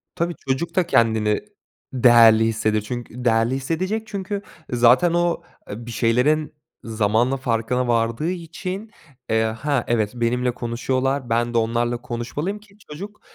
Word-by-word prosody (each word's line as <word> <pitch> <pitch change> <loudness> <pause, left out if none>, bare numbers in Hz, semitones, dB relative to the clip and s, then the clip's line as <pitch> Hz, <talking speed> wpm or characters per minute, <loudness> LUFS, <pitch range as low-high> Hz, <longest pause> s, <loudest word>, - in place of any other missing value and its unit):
Tabii, 170 +1 -1
çocuk 135 +6 -1
da 185 -2 +3
kendini 110 -2 +2 0.5
değerli 115 -3 +6
hissedir 110 -1 0 0.2
değerli 120 0 +1
hissedecek 185 +11 -2
çünkü 200 -1 -4 0.3
zaten 125 +8 +4
o, 175 0 +1 0.3
ııı, 115 +3 -7
bir - - -7
şeylerin 125 +8 +1 0.3
zamanla 115 +3 +1
farkına 125 0 -1
vardığı 115 +7 0
için, 185 +4 -6 0.4
eee, 110 0 +3
"Ha, 120 +4 -1
evet 110 -3 +1
benimle 125 +1 0
konuşuyorlar, 130 +2 -2
ben 120 +1 0
de - - +4
onlarla 120 +1 0
konuşmalıyım 145 - -4
ki" 205 -1 -22
Çocuk, 200 +8 -8
125 Hz, 130 wpm, -22 LUFS, 115-165 Hz, 0.5 s, değerli